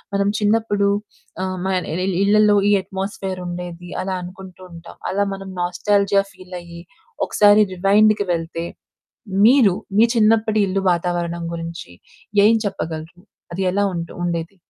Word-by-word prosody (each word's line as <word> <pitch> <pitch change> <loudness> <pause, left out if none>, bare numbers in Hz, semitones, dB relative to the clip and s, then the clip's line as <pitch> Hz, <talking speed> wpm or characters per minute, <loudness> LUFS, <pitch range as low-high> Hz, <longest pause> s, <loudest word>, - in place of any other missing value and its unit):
మనం 200 0 +2
చిన్నప్పుడు 205 -1 +1 0.6
ఆహ్, 185 0 -3
మ - - 0 0.4
ఇ 190 - -1 0.2
ఇళ్ళలో 210 +1 +4
ఈ - - +4
అట్మాస్ఫియర్ 190 -1 -5
ఉండేది, 175 0 -7
అలా 190 0 -2
అనుకుంటుంటాం. 180 -2 -11
అలా 200 +1 +1
మనం 195 0 -9
నాస్టాల్జియా 200 +2 +2
ఫీల్ 185 0 -11
అయ్యి, 170 0 -11 0.5
ఒకసారి 210 0 +5
రివైండ్‌కి 205 +2 +3
వెళ్తే, 165 0 -4 0.8
మీరు 240 -7 +5 0.2
మీ 225 - +7
చిన్నప్పటి 220 -1 +3
ఇల్లు 190 +1 -1
వాతావరణం 170 -1 -2
గురించి 165 - -7 0.5
ఏం 225 +2 +5
చెప్పగలరు? 170 -3 -5 0.3
అది 190 +3 -2
ఎలా 200 +1 +1
ఉంటు 170 -1 -5
ఉండేది? 170 +1 -3
190 Hz, 125 wpm, -20 LUFS, 175-205 Hz, 0.8 s, మీ